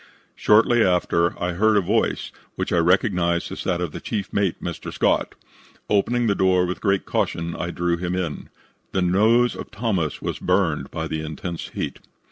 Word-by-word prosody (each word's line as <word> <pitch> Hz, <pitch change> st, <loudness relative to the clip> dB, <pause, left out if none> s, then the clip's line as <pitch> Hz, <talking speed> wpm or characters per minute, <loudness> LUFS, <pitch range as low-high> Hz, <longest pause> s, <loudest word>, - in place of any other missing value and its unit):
Shortly 115 Hz, +2 st, +4 dB
after 85 Hz, -1 st, +1 dB
I 90 Hz, 0 st, -1 dB
heard 110 Hz, +4 st, +3 dB
a -, -, +4 dB
voice, 105 Hz, +5 st, 0 dB, 0.2 s
which -, -, -2 dB
I 85 Hz, -, +4 dB
recognized 90 Hz, -1 st, +2 dB
as -, -, -5 dB
that 90 Hz, -1 st, 0 dB
of 85 Hz, -4 st, -2 dB
the -, -, -6 dB
chief 100 Hz, -5 st, -4 dB
mate, 100 Hz, -4 st, 0 dB
Mr. -, -, -5 dB
Scott. -, -, +1 dB, 0.6 s
Opening 120 Hz, +4 st, +2 dB
the 105 Hz, -, +3 dB
door 95 Hz, -2 st, +3 dB
with 90 Hz, +1 st, -4 dB
great 100 Hz, -2 st, +1 dB
caution, 85 Hz, 0 st, -1 dB
I 85 Hz, -, -3 dB
drew 85 Hz, -1 st, -1 dB
him 90 Hz, +1 st, -2 dB
in. 90 Hz, -5 st, -4 dB, 0.4 s
The 95 Hz, -, +1 dB
nose 110 Hz, +7 st, +3 dB
of -, -, -8 dB
Thomas 95 Hz, -8 st, -1 dB
was -, -, -4 dB
burned 85 Hz, -7 st, +1 dB
by 80 Hz, -1 st, -4 dB
the 80 Hz, 0 st, -3 dB
intense 80 Hz, +2 st, -5 dB
heat. -, -, -4 dB
90 Hz, 180 wpm, -23 LUFS, 85-105 Hz, 0.6 s, Shortly